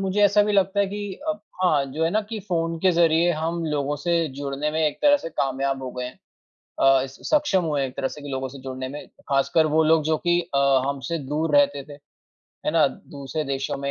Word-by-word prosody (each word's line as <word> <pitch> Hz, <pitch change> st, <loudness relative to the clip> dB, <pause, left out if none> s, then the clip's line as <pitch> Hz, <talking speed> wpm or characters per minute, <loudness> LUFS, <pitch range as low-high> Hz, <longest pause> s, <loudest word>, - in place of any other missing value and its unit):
मुझे 195 Hz, +1 st, 0 dB
ऐसा 205 Hz, +1 st, +5 dB
भी 210 Hz, -, 0 dB
लगता 195 Hz, 0 st, +2 dB
है 200 Hz, -, +2 dB
कि 205 Hz, 0 st, -5 dB
अब 210 Hz, 0 st, -2 dB, 0.2 s
हाँ 150 Hz, -6 st, +3 dB
जो 160 Hz, -, -1 dB
है 165 Hz, -, +1 dB
ना 215 Hz, -, +2 dB
कि 220 Hz, -, -4 dB
फ़ोन 165 Hz, -1 st, -1 dB
के 190 Hz, -, +4 dB
ज़रिए 170 Hz, 0 st, +3 dB
हम 165 Hz, +1 st, -2 dB
लोगों 145 Hz, -1 st, -1 dB
से 170 Hz, +2 st, 0 dB
जुड़ने 140 Hz, +1 st, -2 dB
में 160 Hz, +1 st, -1 dB
एक 150 Hz, -, -3 dB
तरह 290 Hz, -1 st, +6 dB
से 225 Hz, -, -6 dB
कामयाब 135 Hz, -2 st, -1 dB
हो 130 Hz, -, -5 dB
गए 125 Hz, -, -4 dB
हैं। 125 Hz, -, -8 dB, 0.6 s
अ, 135 Hz, -1 st, +4 dB
स 135 Hz, -, -10 dB
सक्षम 295 Hz, -, +2 dB
हुए 145 Hz, -4 st, 0 dB
एक 130 Hz, -, -11 dB
तरह 135 Hz, -, -1 dB
से 150 Hz, -, -10 dB
कि 145 Hz, -, -8 dB
लोगों 130 Hz, -1 st, -3 dB
से 135 Hz, +1 st, -11 dB
जुड़ने 130 Hz, 0 st, -5 dB
में 145 Hz, +3 st, -8 dB, 0.2 s
ख़ासकर 140 Hz, +3 st, +2 dB
वो 160 Hz, -, +5 dB
लोग 160 Hz, 0 st, +4 dB
जो 155 Hz, +1 st, +2 dB
कि 175 Hz, 0 st, +4 dB
अ, 140 Hz, -, +3 dB, 0.3 s
हमसे 140 Hz, +4 st, -3 dB
दूर 150 Hz, 0 st, +1 dB
रहते 145 Hz, 0 st, +3 dB
थे। -, -, -15 dB, 0.7 s
है -, -, +3 dB
ना -, -, +5 dB
दूसरे 140 Hz, +2 st, -6 dB
देशों 135 Hz, -1 st, -2 dB
में 140 Hz, 0 st, -3 dB
155 Hz, 235 wpm, -24 LUFS, 140-175 Hz, 0.7 s, तरह